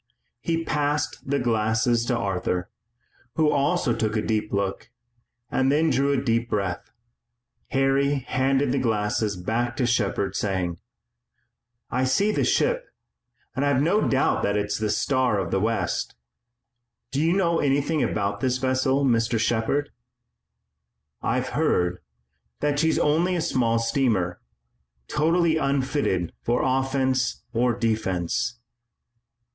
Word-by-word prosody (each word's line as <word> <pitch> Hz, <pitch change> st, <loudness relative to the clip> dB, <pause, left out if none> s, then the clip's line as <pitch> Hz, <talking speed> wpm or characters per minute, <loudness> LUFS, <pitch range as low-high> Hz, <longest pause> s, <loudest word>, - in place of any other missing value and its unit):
He 165 Hz, +7 st, -1 dB
passed 145 Hz, -2 st, -1 dB
the 140 Hz, -, +2 dB
glasses 115 Hz, -1 st, +1 dB
to 125 Hz, -, +1 dB
Arthur, 90 Hz, -4 st, -2 dB, 0.6 s
who 155 Hz, -2 st, +3 dB
also 140 Hz, -3 st, +1 dB
took 110 Hz, -1 st, -1 dB
a -, -, +1 dB, 0.3 s
look, 100 Hz, +2 st, -2 dB, 0.6 s
and 130 Hz, +1 st, +2 dB
then 155 Hz, +2 st, +2 dB
drew 140 Hz, +2 st, +2 dB
a 140 Hz, -, +2 dB
deep 120 Hz, -2 st, 0 dB
breath. 95 Hz, -4 st, -2 dB, 0.8 s
Harry 135 Hz, +1 st, +2 dB
handed 135 Hz, 0 st, 0 dB
the 135 Hz, -, +1 dB
glasses 105 Hz, -3 st, 0 dB
back 120 Hz, +7 st, -2 dB
to 130 Hz, -, +1 dB
Shepard, 100 Hz, -4 st, 0 dB
saying: 90 Hz, -4 st, -2 dB, 1.1 s
"I 130 Hz, -, +1 dB
see 195 Hz, +12 st, +2 dB
the -, -, 0 dB
ship, -, -, +1 dB, 0.7 s
and 135 Hz, -, 0 dB
I've 140 Hz, -2 st, +2 dB
no 195 Hz, +7 st, +2 dB
doubt 135 Hz, -, +2 dB
that 100 Hz, +1 st, 0 dB
it's 105 Hz, 0 st, -1 dB
the 110 Hz, -1 st, -1 dB
Star 130 Hz, 0 st, +1 dB
of 95 Hz, -4 st, -2 dB
the 95 Hz, -, +1 dB
West. 115 Hz, +3 st, -1 dB, 1.0 s
Do 140 Hz, +2 st, 0 dB
you 165 Hz, +2 st, +3 dB
know 170 Hz, -3 st, +2 dB
anything 145 Hz, +2 st, +1 dB
about 100 Hz, -1 st, -1 dB
this 130 Hz, -1 st, 0 dB
vessel, 130 Hz, +1 st, +1 dB
Mr. 115 Hz, -2 st, +2 dB
Shepard?" 120 Hz, +6 st, 0 dB, 1.3 s
"I've -, -, -1 dB
heard 90 Hz, 0 st, +1 dB, 0.6 s
that 145 Hz, -1 st, 0 dB
she's 160 Hz, +1 st, +2 dB
only 165 Hz, +5 st, +2 dB
a -, -, 0 dB
small 115 Hz, -6 st, +1 dB
steamer, 115 Hz, -7 st, 0 dB, 0.7 s
totally 165 Hz, +1 st, +2 dB
unfitted 135 Hz, -, 0 dB
for 120 Hz, +1 st, 0 dB
offense 130 Hz, -1 st, 0 dB
or 120 Hz, 0 st, +2 dB
defense." 110 Hz, -2 st, -1 dB
130 Hz, 130 wpm, -24 LUFS, 110-140 Hz, 1.3 s, who